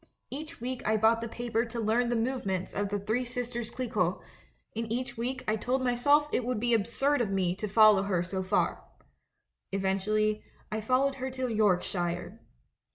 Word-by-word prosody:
Each 310 +4 -6
week 250 +1 -4
I 220 0 +2
bought 225 +1 +4
the 230 - -3
paper 235 0 -1
to 235 0 -5
learn 230 +2 +2
the 240 - +1
movements 225 -6 -1
of 205 0 -1
The 205 - -1
Three 220 +5 -1
Sisters 240 -2 -4
Clicquot; 220 -8 -1 0.6
and 225 0 -3
each 245 +1 -2
week 255 +3 -3
I 215 - +2
told 255 +4 -1
myself 285 +5 +3
it - - +1
would 245 -1 -1
be 240 +1 +1
absurd 245 +6 +2
of 220 - 0
me 185 -2 +1
to 210 - -3
follow 215 -1 +6
her 190 -3 0
sa 190 +1 -3
far. 185 - 0 0.9
Eventually, 210 +2 0 0.3
I 215 0 -2
followed 260 +4 +2
her 260 - -1
to 255 -2 -3
Yorkshire. 180 -4 0
225 Hz, 175 wpm, -29 LUFS, 205-250 Hz, 0.9 s, follow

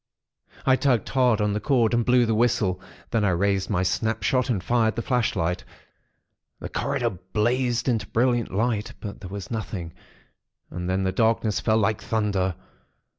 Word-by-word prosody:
I 130 -1 +4
tugged 125 -7 +1
hard 125 -5 +3
on 105 -1 +1
the 105 - -1
cord, 120 -1 +2
and 120 0 +3
blew 125 +1 +4
the 115 - +1
whistle; 105 -5 +1 0.3
then 115 -2 +1
I 100 - +3
raised 95 +2 +1
my 95 -4 +1
snapshot, 110 +6 0
and 100 -7 0
fired 115 -1 +2
the 115 - -3
flashlight. 95 -9 0 1.0
The - - -6
corridor - - -1
blazed 115 +8 -1
into 110 -5 0
brilliant 120 -1 +1
light; 110 +1 -1
but 105 -1 -7
there 95 - -8
was 100 +2 -7
nothing; 95 -7 -4 0.8
and 90 +2 -4
then 95 +1 0
the 95 - +1
darkness 110 +1 +1
fell 110 -1 +2
like 110 -1 +1
thunder. 100 -5 0
110 Hz, 165 wpm, -25 LUFS, 95-120 Hz, 1.0 s, I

